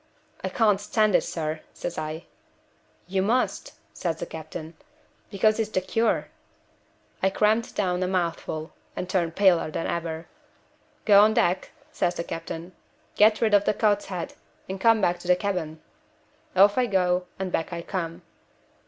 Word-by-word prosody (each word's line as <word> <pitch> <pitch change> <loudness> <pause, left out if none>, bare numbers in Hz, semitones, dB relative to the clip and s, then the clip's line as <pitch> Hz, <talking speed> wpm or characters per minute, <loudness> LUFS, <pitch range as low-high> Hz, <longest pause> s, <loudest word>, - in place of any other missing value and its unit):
'I - - -1
can't 210 -4 +2
stand 215 0 +2
it, - - +5
sir,' 155 -1 -3 0.2
says 175 - -4
I. 155 +2 -5 0.8
'You 190 +1 0
must,' 235 +6 0 0.2
says 165 -2 -2
the - - -4
captain, 160 +1 -8 0.6
'because 215 +3 +2
it's 220 -1 0
the 200 - +1
cure.' 225 +5 0 0.9
I 190 - +3
crammed 215 +3 +1
down 180 -3 0
a 185 - +1
mouthful, 170 -3 -2 0.2
and 180 - -4
turned 175 -3 0
paler 185 -5 +4
than 160 - -3
ever. 165 -1 -3 0.8
'Go 205 -2 +8
on 215 +1 +4
deck,' 180 +2 +1 0.2
says 175 - 0
the - - -3
captain. 165 +1 -6 0.4
'Get 215 +1 +5
rid 220 -2 +2
of 205 0 +5
the - - +2
cod's 205 -1 +2
head, 180 -3 -5 0.3
and 190 0 -5
come 225 0 +5
back 175 -2 +1
to 175 - -10
the 180 - +6
cabin.' 180 -5 -3 0.8
Off 200 +4 +6
I 250 - +2
go, 180 -3 +1
and 190 -1 -3
back 165 +1 -1
I 170 -1 -4
come. 170 -3 -4
185 Hz, 160 wpm, -26 LUFS, 170-205 Hz, 0.9 s, Go